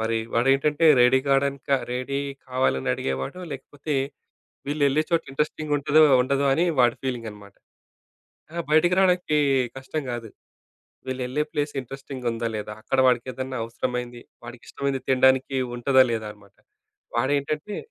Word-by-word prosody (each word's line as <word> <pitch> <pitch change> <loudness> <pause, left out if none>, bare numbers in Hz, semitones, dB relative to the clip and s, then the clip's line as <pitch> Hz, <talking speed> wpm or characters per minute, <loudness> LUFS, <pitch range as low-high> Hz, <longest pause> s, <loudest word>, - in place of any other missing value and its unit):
మరి 110 0 0 0.2
వాడేంటంటే 135 +6 +3 0.2
ready 125 +2 +5
కాడానికా 140 0 +1 0.2
ready 130 +2 -2 0.3
కావాలని 125 - 0
అడిగేవాడో 65 - -4
లేకపోతే. 145 +3 -6 0.7
వీళ్ళెళ్ళే 145 +1 +2
చోట 165 -1 +2
ఇంట్రెస్టింగుంటదో 150 +1 +1 0.2
ఉండదో 140 +2 0
అని 165 +5 +2
వాడి 120 -1 +4
ఫీలింగ్ 125 -3 -3
అనమాట. 100 -1 -14 1.0
ఆ! - - -7
బయటకి 160 +4 +4
రావడానికి 180 -5 +2 0.4
కష్టం 135 +3 -4
గాదు. 120 -2 -5 0.8
వీళ్ళెల్లే 130 +2 -2
ప్లేస్ 145 -1 -1
ఇంట్రెస్టింగ్ 135 0 -9
ఉందా 115 0 -3
లేదా? 105 0 -5
అక్కడ 130 +5 -2
వాడికేదన్నా 130 +1 -2
అవసరమైంది. 120 +1 -4 0.2
వాడికి 120 0 -10
ఇష్టమైంది 140 -1 -2
తినడానికి 130 +1 +3 0.2
ఉంటదా 130 +2 +5
లేదా 110 -1 -3
అనమాట. 100 -1 -22 0.6
వాడేంటంటే? 145 - -1
130 Hz, 120 wpm, -24 LUFS, 120-145 Hz, 1.0 s, ready